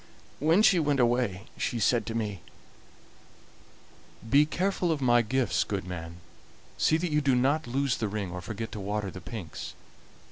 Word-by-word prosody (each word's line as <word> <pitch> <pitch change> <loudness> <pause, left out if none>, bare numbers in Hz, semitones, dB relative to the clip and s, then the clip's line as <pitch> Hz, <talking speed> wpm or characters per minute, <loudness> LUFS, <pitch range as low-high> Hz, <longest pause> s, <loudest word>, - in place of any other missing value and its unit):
When 165 +8 +4
she 185 -5 +6
went 145 -3 +1
away 120 -6 +1 0.2
she 120 - -1
said 115 +2 +2
to 115 - -3
me: 105 -5 -3 1.9
"'Be 145 +5 +5
careful 180 0 0
of 155 - 0
my 120 -2 +4
gifts, 125 +3 +1
good 100 -3 -3
man; 85 -2 -6 0.6
see 160 - +3
that 170 0 -2
you 150 0 +2
do 135 -3 +3
not 135 +4 +1
lose 135 +1 0
the 110 - -1
ring 100 -3 -3
or 90 0 -5
forget 110 +5 -5
to 110 - -6
water 100 0 -3
the 95 - -9
pinks. 90 -4 -7
120 Hz, 170 wpm, -28 LUFS, 100-145 Hz, 1.9 s, she